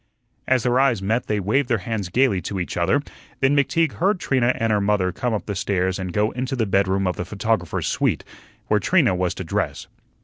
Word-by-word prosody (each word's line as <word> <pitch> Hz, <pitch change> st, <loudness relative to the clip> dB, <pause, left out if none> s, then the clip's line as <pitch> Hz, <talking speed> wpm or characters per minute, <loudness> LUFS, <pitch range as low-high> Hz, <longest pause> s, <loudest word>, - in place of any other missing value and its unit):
As 130 Hz, -3 st, +2 dB
their 125 Hz, 0 st, +2 dB
eyes 135 Hz, -5 st, +3 dB
met 110 Hz, +5 st, -1 dB
they 105 Hz, -1 st, 0 dB
waved 120 Hz, +8 st, 0 dB
their 115 Hz, -, +2 dB
hands 105 Hz, -5 st, -3 dB
gayly 105 Hz, -3 st, +2 dB
to 95 Hz, +3 st, -4 dB
each 90 Hz, -, -4 dB
other; 95 Hz, +12 st, +1 dB, 0.4 s
then 135 Hz, +1 st, +3 dB
McTeague 155 Hz, +2 st, +2 dB
heard 190 Hz, +3 st, 0 dB
Trina 130 Hz, -6 st, +2 dB
and 115 Hz, -1 st, +1 dB
her 105 Hz, -, +2 dB
mother 100 Hz, -2 st, +1 dB
come 125 Hz, +3 st, -2 dB
up 105 Hz, -, -4 dB
the 105 Hz, -, -3 dB
stairs 95 Hz, -1 st, -1 dB
and 95 Hz, -1 st, -4 dB
go 105 Hz, +4 st, +1 dB
into 130 Hz, +2 st, -3 dB
the 115 Hz, -3 st, 0 dB
bedroom 95 Hz, -1 st, +1 dB
of 90 Hz, -, -1 dB
the -, -, -2 dB
photographer's 100 Hz, -2 st, -1 dB
suite, -, -, 0 dB, 0.4 s
where -, -, +2 dB
Trina -, -, +3 dB
was 90 Hz, -1 st, -1 dB
to -, -, -5 dB
dress. -, -, -2 dB
105 Hz, 215 wpm, -22 LUFS, 95-130 Hz, 0.4 s, eyes